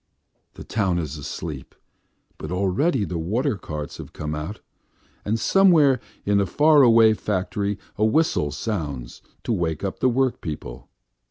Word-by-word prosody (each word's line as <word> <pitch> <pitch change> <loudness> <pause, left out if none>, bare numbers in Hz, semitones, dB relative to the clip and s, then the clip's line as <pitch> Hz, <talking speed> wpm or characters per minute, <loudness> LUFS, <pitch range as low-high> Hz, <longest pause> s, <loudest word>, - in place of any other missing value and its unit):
The - - -9
town 95 -5 0
is 80 -4 -3
asleep, 75 -1 -7 0.6
but - - -6
already 100 - +1
the 85 -1 -4
water 115 - 0
carts 75 -6 -6
have - - -10
come 75 0 -4
out, 75 +8 -5 0.6
and 110 +2 -1
somewhere 160 - +5 0.3
in 100 0 +3
a 100 - +1
far 150 +4 +5
away 115 -3 +6
factory 100 0 -2 0.2
a - - +2
whistle 110 - +2
sounds 70 - -4 0.2
to 120 - -1
wake 80 -5 -2
up 95 - -3
the 130 - +3
workpeople. 90 - -3
100 Hz, 145 wpm, -23 LUFS, 80-120 Hz, 0.6 s, away